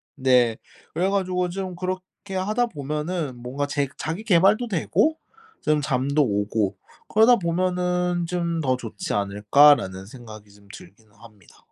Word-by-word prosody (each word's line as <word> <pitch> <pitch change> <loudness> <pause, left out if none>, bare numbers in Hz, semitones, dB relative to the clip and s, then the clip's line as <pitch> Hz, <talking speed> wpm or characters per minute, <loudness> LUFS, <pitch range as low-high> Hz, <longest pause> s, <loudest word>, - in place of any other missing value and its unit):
네. 125 -5 +3 0.4
그래 185 +3 0
가지고 185 -2 0
좀 185 0 -5
그렇게 185 +2 -6
하다 215 +6 0
보면은 150 - -4
뭔가 135 +4 -3
제 140 -1 -1
자기 165 +9 -4
계발도 200 +5 +3
되고 235 - +1 0.4
좀 150 -1 +1
잠도 140 +1 +1
오고 105 -2 -1 0.3
그러다 225 +3 +5
보면은 180 0 -1
좀 170 -2 -2
'더 130 -3 +1
좋지 115 -5 -6
않을까.'라는 100 0 +3
생각이 110 -2 -12
좀 100 0 -21
들기는 115 - -15
합니다. 105 -3 -19
150 Hz, 280 characters per minute, -23 LUFS, 120-185 Hz, 0.4 s, 그러다